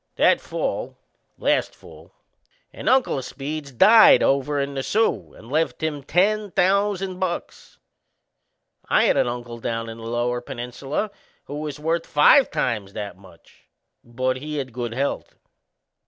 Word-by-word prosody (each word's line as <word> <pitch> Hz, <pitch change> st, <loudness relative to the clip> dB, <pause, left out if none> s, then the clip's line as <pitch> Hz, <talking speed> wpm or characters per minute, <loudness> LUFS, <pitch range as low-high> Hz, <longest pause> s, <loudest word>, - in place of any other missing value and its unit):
That -, -, +3 dB
fall -, -, -4 dB, 0.4 s
last -, -, 0 dB
fall -, -, -16 dB, 0.6 s
an -, -, -2 dB
uncle 260 Hz, -, +3 dB
o' -, -, -2 dB
Speed's 140 Hz, +2 st, -6 dB
died 220 Hz, -, +7 dB
over 140 Hz, +1 st, +1 dB
in 140 Hz, 0 st, -2 dB
the 135 Hz, -, -3 dB
Soo 215 Hz, -, 0 dB
and 115 Hz, -, -14 dB
left 160 Hz, +1 st, -1 dB
him 150 Hz, -2 st, -2 dB
ten 205 Hz, +8 st, +1 dB
thousand 195 Hz, 0 st, +1 dB
bucks. 185 Hz, -2 st, -5 dB, 1.1 s
I -, -, +4 dB
had -, -, +3 dB
an -, -, +2 dB
uncle 120 Hz, -1 st, -6 dB
down 115 Hz, 0 st, -3 dB
in 115 Hz, 0 st, -9 dB
the -, -, -10 dB
Lower 120 Hz, +1 st, -1 dB
Peninsula 135 Hz, -, -4 dB, 0.3 s
who 145 Hz, -, -7 dB
was 150 Hz, -2 st, -5 dB
worth 165 Hz, +2 st, -1 dB
five 255 Hz, -, +5 dB
times 105 Hz, -5 st, -2 dB
that 100 Hz, -3 st, -6 dB
much 95 Hz, -3 st, -20 dB, 0.4 s
but 130 Hz, +2 st, -2 dB
he 150 Hz, +3 st, -5 dB
had 130 Hz, -4 st, -4 dB
good 120 Hz, -1 st, -4 dB
health! 140 Hz, +2 st, -3 dB
140 Hz, 150 wpm, -23 LUFS, 120-170 Hz, 1.1 s, died